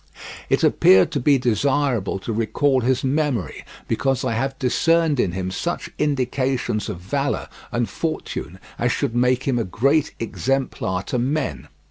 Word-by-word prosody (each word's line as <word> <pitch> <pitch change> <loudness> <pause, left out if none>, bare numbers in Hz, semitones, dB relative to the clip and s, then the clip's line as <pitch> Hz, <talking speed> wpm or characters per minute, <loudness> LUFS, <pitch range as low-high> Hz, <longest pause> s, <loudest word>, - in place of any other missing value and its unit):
It - - +2
appeared 95 0 +5
to 145 - -1
be 140 +2 +4
desirable 125 -2 +1
to 115 - -3
recall 125 +5 +1
his 130 +2 +1
memory, 135 - -1 0.2
because 135 -2 0
I 125 - 0
have 135 +4 -2
discerned 160 +3 +2
in 90 - +1
him 95 0 -3
such 95 - -3
indications 130 -5 0
of 95 -5 -5
valour 135 +10 -2 0.2
and 120 -1 0
fortune 155 - -4 0.2
as 120 0 +2
should 130 -3 -1
make 125 +1 +2
him 130 -3 0
a - - +1
great 135 - +1
exemplar 115 -6 -1
to 125 - -2
men. 130 - -2
125 Hz, 150 wpm, -22 LUFS, 110-140 Hz, 0.2 s, appeared